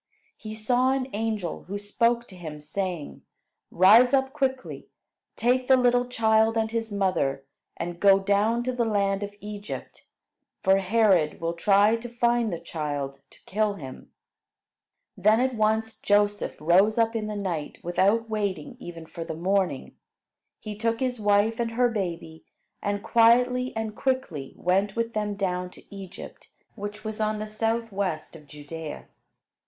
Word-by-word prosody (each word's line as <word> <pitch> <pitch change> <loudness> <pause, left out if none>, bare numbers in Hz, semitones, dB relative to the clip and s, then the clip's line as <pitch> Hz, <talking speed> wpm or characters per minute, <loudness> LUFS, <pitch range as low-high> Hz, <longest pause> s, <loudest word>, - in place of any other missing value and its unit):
He 215 0 -8
saw 245 +4 +2
an 270 -1 -2
angel, 210 -5 -3
who 200 +3 -4
spoke 235 +4 0
to 185 - -12
him, 155 -4 -8
saying: 170 +1 -4 0.5
"Rise 225 +9 +6
up 265 0 0
quickly; 265 -3 -2 0.5
take 250 +2 +1
the 265 - +6
little 245 0 +3
child 220 -1 +2
and 220 0 0
his 225 -1 -2
mother, 165 -9 0 0.3
and 175 0 -5
go 195 0 +6
down 205 +4 +1
to 255 - -1
the 245 -1 0
land 200 -3 +1
of 205 0 -5
Egypt, 210 0 -8 0.6
for 190 +1 +5
Herod 195 -5 +2
will 165 0 -2
try 200 +5 +4
to 240 +1 -8
find 240 -2 +1
the 170 - -3
child 145 -4 -4
to - - -22
kill 210 +1 0
him." 135 -7 -10 1.0
Then 215 +4 +4
at 260 +1 +1
once 220 0 0
Joseph 205 0 +1
rose 185 +8 +4
up 225 0 +2
in 215 -1 -2
the 210 - -4
night, 175 -7 -3
without 200 +6 +2
waiting 215 +4 -3
even 170 -6 -9
for 165 +1 -7
the 160 - -6
morning. 185 -4 -1 0.6
He 210 -1 -7
took 230 +2 -1
his 250 -2 -1
wife 210 +2 +2
and 235 -1 0
her 245 +1 +3
baby, 170 -7 -4 0.4
and 205 0 -2
quietly 250 +2 +4
and 220 -1 -3
quickly 255 - -2
went 195 +3 +1
with 230 0 -2
them 210 -1 -2
down 180 -2 -2
to 200 - -15
Egypt, 190 -1 -10 0.2
which 205 0 -7
was 220 0 -4
on 215 0 0
the 215 - -4
southwest 215 -7 -2
of 150 -2 -14
Judea. 150 +2 -8
210 Hz, 155 wpm, -26 LUFS, 185-230 Hz, 1.0 s, Rise